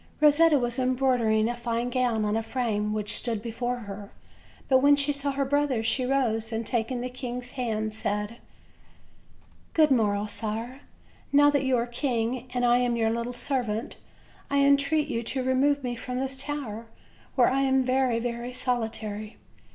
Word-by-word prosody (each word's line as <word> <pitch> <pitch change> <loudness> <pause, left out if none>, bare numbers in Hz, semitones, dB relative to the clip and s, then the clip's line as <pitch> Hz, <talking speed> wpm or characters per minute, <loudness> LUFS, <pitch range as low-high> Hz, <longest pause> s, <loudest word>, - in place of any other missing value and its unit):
Rosetta 300 +1 +5
was 240 0 -1
embroidering 250 -4 +2
a 240 - -2
fine 240 0 -2
gown 240 -4 +1
on 210 +1 0
a 225 - +1
frame 220 -3 -1
which 210 -1 -1
stood 230 -3 -1
before 240 +2 -3
her, 200 -1 -8 0.6
but 260 -1 +5
when 285 +2 +6
she 285 +1 +1
saw 280 0 0
her 275 0 -1
brothers 275 -4 0
she 250 +2 +1
rose, 235 -4 0
and, 225 0 -2
taking 240 +2 -1
the 250 - -2
king's 250 -1 -5
hand, 220 -4 -2
said: 210 +1 -2 1.4
"Good 310 -3 +5
morrow, 210 -4 +2
sire; 225 +5 -4 0.5
now 290 +1 +6
that 285 -2 +1
you 260 -1 +2
are 235 - 0
king, 240 0 -2
and 245 -1 0
I 240 0 +5
am 245 -1 +1
your 225 -1 +1
little 235 +1 -2
servant, 245 -3 -2 0.5
I 280 0 +2
entreat 280 +2 +3
you 230 - -2
to 260 +3 -2
remove 275 +2 +2
me 245 -1 -2
from 250 +2 -4
this 265 0 -1
tower, 265 -5 -4 0.5
where 250 - +5
I 270 +1 +1
am 265 -1 +3
very, 255 -2 +2
very 240 +1 -4
solitary." 225 -4 -3
245 Hz, 170 wpm, -27 LUFS, 225-265 Hz, 1.4 s, when